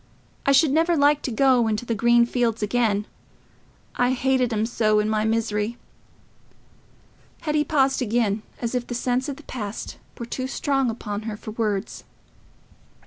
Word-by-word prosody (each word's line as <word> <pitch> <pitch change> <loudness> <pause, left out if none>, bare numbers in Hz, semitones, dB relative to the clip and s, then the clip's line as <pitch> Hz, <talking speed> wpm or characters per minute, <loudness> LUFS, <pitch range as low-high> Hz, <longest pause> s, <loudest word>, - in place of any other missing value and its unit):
I - - +6
should 275 +1 +5
never 330 +3 +2
like 290 0 +4
to 260 - -3
go 250 -1 +3
into 215 +2 -1
the 235 - -1
green 235 +2 +4
fields 235 -3 -1
again—I 225 +3 -3
hated 260 -1 +1
'em 215 0 0
so 215 -2 +1
in 210 - +1
my 215 0 0
misery." 220 0 -1 1.6
Hetty 300 -1 +1
paused 275 -3 +1
again, 220 -3 0 0.2
as 235 0 -3
if 245 -1 -2
the 245 - -4
sense 250 +3 -1
of 280 - -4
the 305 - -14
past 215 -6 -6 0.2
were 235 - -5
too 255 +2 -4
strong 270 -1 0
upon 210 -2 -4
her 210 - -5
for 215 - -8
words. 210 -3 -2
240 Hz, 155 wpm, -24 LUFS, 215-265 Hz, 1.6 s, I